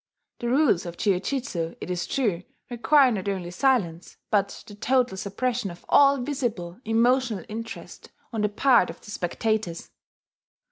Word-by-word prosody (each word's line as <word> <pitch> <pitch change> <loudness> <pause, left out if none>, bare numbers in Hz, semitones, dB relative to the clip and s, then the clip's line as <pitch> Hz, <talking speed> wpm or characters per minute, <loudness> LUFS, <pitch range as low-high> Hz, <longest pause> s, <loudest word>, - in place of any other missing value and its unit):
(The 240 - -2
rules 255 - +3
of 170 0 -7
jiujutsu, 195 -3 -1
it - - -5
is 175 -1 -2
true, 210 -10 0 0.3
require 265 +3 +4
not 200 -3 -2
only 185 -3 -3
silence, 180 -7 0
but 200 -1 0
the 205 - -11
total 250 +1 +1
suppression 210 +3 -2
of 175 0 -12
all 280 0 +6
visible 240 - -3
emotional 235 0 +2
interest 225 +2 -8 0.2
on 220 - -1
the 210 - +2
part 225 -2 +4
of - - -9
the 210 - -11
spectators.) 205 -1 -2
220 Hz, 145 wpm, -25 LUFS, 185-255 Hz, 0.3 s, all